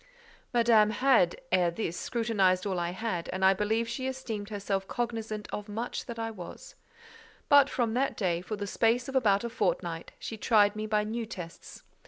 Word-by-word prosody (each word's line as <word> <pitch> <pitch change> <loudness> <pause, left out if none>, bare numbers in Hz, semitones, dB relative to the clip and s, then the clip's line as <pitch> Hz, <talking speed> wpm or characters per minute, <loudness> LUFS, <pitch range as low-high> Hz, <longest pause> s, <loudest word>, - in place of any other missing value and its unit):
Madame 230 -3 +5
had, 230 -7 +3
ere 180 -2 +4
this, 170 -1 -3
scrutinized 200 -5 +1
all 190 -3 -1
I 170 0 -1
had, 185 -2 -3
and 190 +1 0
I 190 - +7
believe 220 +3 0
she 260 +3 -3
esteemed 230 -6 -5
herself 200 -2 -2
cognizant 225 -3 -3
of 210 0 -5
much 225 +4 -4
that 235 -2 -6
I 225 0 -3
was; 180 -5 -10 0.8
but 285 -2 +7
from 240 -4 0
that 270 +3 0
day, 175 -4 0
for 215 +4 -4
the 205 -1 -4
space 230 +4 +1
of 270 - -6
about 205 -5 +3
a 235 - -2
fortnight, - - -2
she 225 - -6
tried 210 -2 +4
me 215 0 -3
by 210 -1 +2
new 225 +2 -3
tests. 175 -6 -9
215 Hz, 185 wpm, -29 LUFS, 195-235 Hz, 0.8 s, I